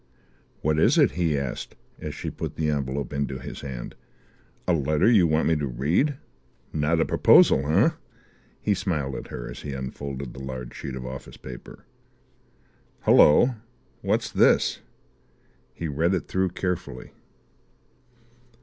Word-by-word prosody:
"What 75 0 +2
is - - +4
it?" - - +5
he 80 -1 0
asked, 70 -3 -4 0.2
as 75 -1 -6
she - - -5
put - - -6
the 75 -1 0
envelope 70 -2 -3
into 70 -2 -2
his 65 - -8
hand. 65 -4 -6 0.7
"A 90 - +3
letter 75 +3 +2
you 105 -8 +5
want 80 0 +2
me 80 - +3
to 75 -2 -2
read? 75 - +1 0.6
Not 80 +2 +1
a - - +3
proposal, 70 +2 +5
eh?" 100 - +4 0.7
He 105 - +2
smiled 85 -9 -2
at - - -6
her - - -7
as - - -8
he 70 - -5
unfolded 70 0 -6
the 65 - -10
large 65 -2 -6
sheet 65 - -6
of 65 -1 -6
office 65 +1 -8
paper. 60 -2 -11 1.2
"Hullo, 120 - +6 0.5
what's - - 0
this?" - - +3 0.9
He 85 - -5
read 80 +6 +1
it 90 - -4
through 95 0 0
carefully. 90 -8 -4
75 Hz, 145 wpm, -25 LUFS, 65-85 Hz, 1.2 s, Hullo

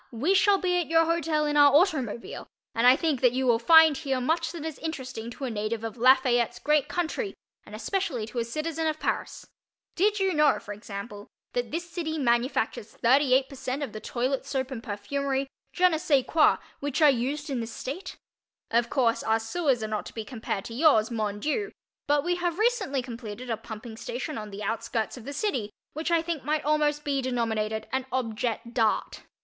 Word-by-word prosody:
_ - - -30
we 270 +11 +1
shall 395 +1 +5
be 360 -2 +1
at 345 - -2
your 330 0 +4
hotel 325 -2 +1
in 295 0 0
our 290 -1 +7
automobile 290 - 0 0.3
and 230 +2 +3
I 250 - +8
think 305 -4 -1
that 250 -2 +4
you 260 +1 0
will 235 -2 +4
find 320 +4 +7
here 270 -4 -1
much 320 +6 0
that 330 -3 -7
is 320 -3 -5
interesting 260 -8 -5
to 240 - -9
a 255 - -2
native 215 +1 -3
of 225 0 -4
Lafayette's 245 -1 +4
great 300 +3 +2
country 355 +5 -2 0.3
and - - -9
especially 370 - -2
to 235 +2 -5
a - - +1
citizen 310 +6 -2
of 310 0 -1
Paris. - - -3 0.5
Did 415 +3 +2
you 385 -1 +2
know, 300 -2 +4
for 205 - -7
example, 205 0 -8 0.3
that 245 -1 -1
this 340 +3 -4
city 325 -2 -3
manufactures 235 -4 0
38% 265 +1 +2
of 260 - -5
the 215 - -5
toilet 255 +4 -2
soap 270 -1 -3
and 245 -4 -5
perfumery 270 +5 -2 0.3
je 365 0 +4
ne 320 -3 0
sais 280 -5 +2
quoi 315 -2 +4 0.2
which 285 +1 -2
are 300 -2 +7
used 280 +4 -2
in 260 - -1
this 230 0 -5
state? 355 +12 -6 0.5
Of 235 +1 +2
course, 235 -4 +2
our 225 0 +1
sewers 250 +1 0
are - - -2
not 215 -1 -3
to - - -12
be 220 -2 -4
compared 220 -5 -4
to 230 - -7
yours, 240 -5 +4
mon 210 -3 -2
Dieu, 360 - -1 0.4
but 290 0 +3
we 350 +1 0
have 350 -1 -1
recently 415 - +1
completed 235 -1 -7
a - - +1
pumping 220 +1 -9
station 475 - -5
on 210 -1 -7
the 205 +1 -7
outskirts 225 +1 -2
of 245 -3 -11
the 280 - -5
city 280 - -1 0.2
which 315 +3 -3
I 335 -1 +2
think 330 -4 -3
might 300 +2 -1
almost 300 0 +1
be 280 -2 0
denominated 220 -4 -1
an 265 0 -2
objet 235 -1 -2
d'art. 225 -3 0
265 Hz, 200 wpm, -27 LUFS, 230-315 Hz, 0.5 s, I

